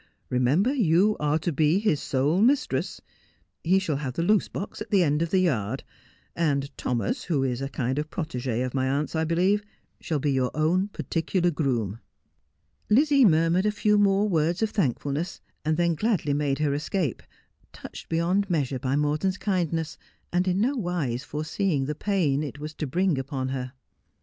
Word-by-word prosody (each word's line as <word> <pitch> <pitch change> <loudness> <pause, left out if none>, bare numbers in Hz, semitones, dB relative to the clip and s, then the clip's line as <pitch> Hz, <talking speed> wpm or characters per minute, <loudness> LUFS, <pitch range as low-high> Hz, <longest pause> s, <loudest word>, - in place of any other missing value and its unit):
Remember 140 - +2
you 205 - +3
are 150 +1 +1
to 160 +2 -2
be 155 +4 +3
his 200 -9 +1
sole 145 +8 +1
mistress. 270 +5 +1 0.6
He 185 +3 +3
shall 165 -7 0
have 135 -3 -4
the 165 - 0
loose 210 +3 +3
box 200 +2 -6
at 215 - -5
the 195 -4 +4
end 150 -1 +1
of 165 - 0
the 190 - +2
yard, 120 - 0 0.5
and 140 -4 0
Thomas, 115 -5 -2
who 150 -7 0
is 130 -1 -1
a 135 - -3
kind 130 0 -2
of 150 +1 -4
protegi 130 -8 -2
of 125 - -5
my 130 -1 0
aunt's, 145 +4 -1
I 160 0 +1
believe, 185 +5 +2 0.4
shall 160 - -2
be 145 0 0
your 130 -2 +1
own 170 +6 +2
particular 175 -2 -1
groom.' 120 - -1 0.9
Lizzie 280 +3 +5
murmured 165 +2 +3
a - - +2
few 210 0 +2
more 200 +1 +3
words 170 +2 +1
of 220 - 0
thankfulness, 145 - -1 0.2
and 155 0 0
then 170 -1 +2
gladly 180 -5 0
made 140 -1 0
her 150 -2 0
escape, 150 - -2 0.5
touched - - -10
beyond 180 +5 +1
measure 140 -6 0
by 130 +1 -1
Mor 150 +1 +1
ton's 190 +1 0
kindness, 170 -6 -2 0.3
and 180 +1 +1
in 185 +1 +1
no 255 +7 +1
wise 170 - -2
foreseeing 155 0 -1
the 150 - -2
pain 155 -5 0
it 145 -2 -5
was 150 +1 -7
to 150 - -4
bring 175 +1 +1
upon 135 -1 -3
her. 130 -1 -4
160 Hz, 180 wpm, -26 LUFS, 140-190 Hz, 0.9 s, Lizzie